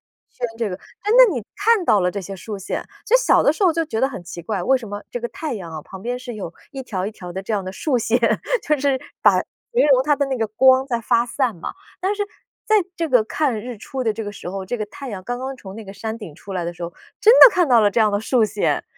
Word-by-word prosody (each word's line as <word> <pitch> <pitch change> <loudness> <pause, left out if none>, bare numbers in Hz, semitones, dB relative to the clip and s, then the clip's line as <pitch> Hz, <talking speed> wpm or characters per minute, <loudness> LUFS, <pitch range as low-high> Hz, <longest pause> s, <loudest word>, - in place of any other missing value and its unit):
一 - - -49
圈 250 - -2
这 225 -3 -2
个。 180 - -3
哎， 410 - -7
那 - - +7
你 240 -5 -4
看 435 -2 +2
到 210 - +4
了 180 0 +1
这 205 - -5
些 195 +2 -7
竖 205 +3 -7
线， 195 - -4 0.2
觉 465 - +2
得 - - +8
小 - - +4
的 285 - +4
时 360 - -5
候 365 - +6
就 330 - +1
觉 255 -8 -3
得 265 - +3
很 190 -10 -8
奇 175 0 -8
怪， 185 +1 -3
为 265 +7 +3
什 230 -4 -9
么 205 +1 -6
这 - - -4
个 480 - -3
太 315 - -5
阳 185 -7 -6
啊， 155 -1 -7
旁 190 +4 -11
边 245 +2 -3
是 250 -1 -7
有 190 -5 -7 0.2
一 270 -2 -6
条 190 -7 -3
一 210 - -3
条 180 -4 -10
的 190 +2 -5
这 205 - -4
样 205 -2 0
的 185 - -5
竖 255 +5 0
线， 230 +1 +1 0.4
就 300 -1 +1
是 275 -1 +2 0.2
把 - - +6
形 480 -8 -1
容 255 -1 +5
它 295 +1 +2
的 280 - +1
那 265 -2 -2
个 225 - +1
光 260 +5 +4
在 235 -3 -1
发 230 +1 +2
散 250 -2 -1
嘛。 165 - -6 0.3
但 380 +3 0
是 410 - -1 0.4
在 435 - +4 0.2
这 330 -2 -1
个 250 -5 +4
看 250 -4 -1
日 245 +1 -7
出 260 +5 -5
的 225 -3 +1
这 220 0 -5
个 205 - -5
时 195 - -8
候， 195 +1 -5
这 220 +6 -3
个 215 - -3
太 280 +4 -9
阳 190 -3 -6
刚 245 0 -3
刚 265 +1 -4
从 195 -5 -10
那 225 - -8
个 195 - -9
山 220 +2 -5
顶 205 -10 -9
出 195 - -10
来 180 -2 -2
的 170 - -3
时 175 - -11
候， 170 0 -4 0.3
真 425 +2 +7
的 - - +12
看 355 -5 +2
到 240 -3 +6
了 205 -1 +4
这 230 - +1
样 215 -1 +4
的 205 - 0
竖 235 +1 +2
线， 215 - 0
230 Hz, 320 characters per minute, -21 LUFS, 200-275 Hz, 0.4 s, 的